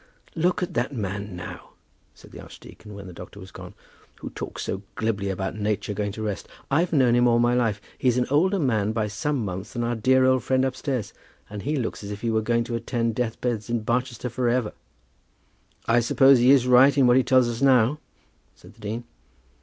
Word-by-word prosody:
"Look 175 +2 0
at 180 0 -4
that 140 - -1
man, 100 -2 -4
now," 90 - -9 0.4
said - - -17
the - - -10
archdeacon, 105 -1 -13
when 100 -1 -9
the 90 - -10
doctor 90 +3 -11
had 95 -1 -12
gone, - - -10 0.4
"who - - -8
talks - - -6
so 95 - -4
glibly 110 -4 -1
about 95 +1 -3
nature 105 0 -2
going 105 0 -2
to 110 - -6
rest. 105 -2 -4 0.2
I've 165 +5 +2
known 130 -6 +3
him 120 0 +4
all 120 -1 +4
my 120 +1 +3
life. 115 -4 +1 0.2
He's 125 -1 +2
an 125 - +2
older 185 +7 +3
man 110 - 0
by 110 -1 0
some 125 +4 -2
months 95 +2 -6
than 120 -2 -2
our 120 +1 -1
dear 130 +3 +3
old 130 -1 +3
friend 130 0 +1
upstairs. 130 -3 -3 0.4
And 105 -1 -6
he 150 +7 -2
looks 120 -5 -3
as 100 - -7
if 105 0 -6
he 115 - -1
were 110 0 +1
going 115 +1 +1
to 115 0 -4
attend 115 -1 -1
death 115 -1 -3
beds 120 -3 -2
in 120 -1 -1
Barchester 125 +2 -2
for 125 +1 -1
ever." 120 -3 0 1.1
"I 115 +1 +3
suppose 135 +3 +5
he 125 +2 +4
is 135 -2 +5
right 130 +2 +6
in 135 - +5
what 120 0 +5
he - - +5
tells 130 -1 +4
us 120 +1 -4
now?" 130 +1 +4 0.6
said - - -17
the - - -21
dean. 110 +3 -4
120 Hz, 215 wpm, -24 LUFS, 105-130 Hz, 1.1 s, right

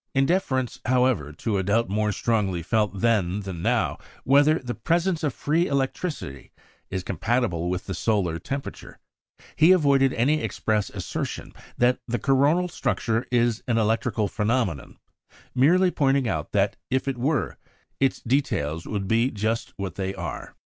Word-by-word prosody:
In 135 0 +4
deference, 135 -7 0
however, 125 - +2
to 100 +7 -2
a - - +1
doubt 115 +5 +1
more 105 +2 0
strongly 100 -6 0
felt 105 0 0
then 105 -4 +1
than 95 -4 -6
now, - - 0 0.2
whether 145 +4 +5
the 125 -5 -5
presence 170 +3 0
of 150 - +1
free 160 +7 0
electricity 135 - -3 0.4
is 95 -1 -3
compatible 95 -3 -1
with 90 0 -3
the 95 - -4
solar 95 -6 0
temperature, 140 +6 -6 0.6
he 160 +4 +6
avoided 140 -6 +4
any 145 +6 +2
express 105 -2 -1
assertion 95 -4 -5 0.2
that 125 +1 +3
the 120 0 -1
coronal 140 - +2
structure 115 -8 -1
is 120 -2 +2
an 120 -2 +1
electrical 110 -1 +1
phenomenon, 105 - -1 0.6
merely 180 +8 +4
pointing 135 -4 +2
out 80 -6 -3
that, 100 0 +1
if 130 +1 0
it 135 -3 -2
were, 140 +3 -1 0.4
its 135 -1 +1
details 85 - -1
would 100 -2 -3
be 115 +5 +2
just 110 0 -2
what 95 -4 -4
they 95 0 -3
are. 85 -5 -6
115 Hz, 150 wpm, -25 LUFS, 100-135 Hz, 0.6 s, he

